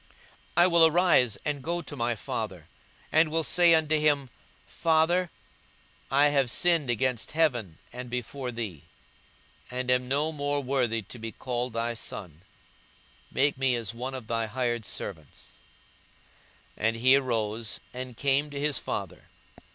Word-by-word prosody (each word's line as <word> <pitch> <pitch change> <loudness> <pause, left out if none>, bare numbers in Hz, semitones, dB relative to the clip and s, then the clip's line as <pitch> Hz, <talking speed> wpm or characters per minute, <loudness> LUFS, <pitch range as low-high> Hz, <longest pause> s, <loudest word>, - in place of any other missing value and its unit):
42:015:018 - - -31 0.5
I 175 - +7
will 170 -2 +6
arise 160 - +3
and 145 -2 -2
go 170 +3 -1
to 150 - -8
my 120 -2 0
father, - - -5 0.4
and 160 0 +4
will 165 +1 0
say 170 +1 +5
unto 155 -1 +2
him, 145 -4 +1 0.3
Father, 170 +2 +2 0.8
I 140 +2 +5
have 140 -3 +2
sinned 165 0 +1
against 120 +2 0
heaven, 120 - +1 0.2
and 125 0 -7
before 125 +1 -4
thee, 110 -10 -5 0.9
42:015:019 125 - -5
And 125 0 0
am 125 0 +2
no 145 +4 +1
more 145 -1 -1
worthy 125 -4 0
to 120 +5 -11
be 115 0 -5
called 125 0 -3
thy 115 +1 -1
son: 90 -7 -7 0.9
make 140 -1 +1
me 135 -2 +3
as 115 -2 -3
one 130 +3 -5
of 130 -4 -7
thy 115 0 -1
hired 120 -1 -2
servants. 80 -7 -8 1.3
42:015:020 110 - +2
And 115 - +1
he 130 +3 +5
arose, 115 -4 -1
and 125 -2 -7
came 140 +1 +2
to 145 -1 -6
his 145 -1 0
father. - - -5
130 Hz, 155 wpm, -28 LUFS, 115-150 Hz, 1.3 s, I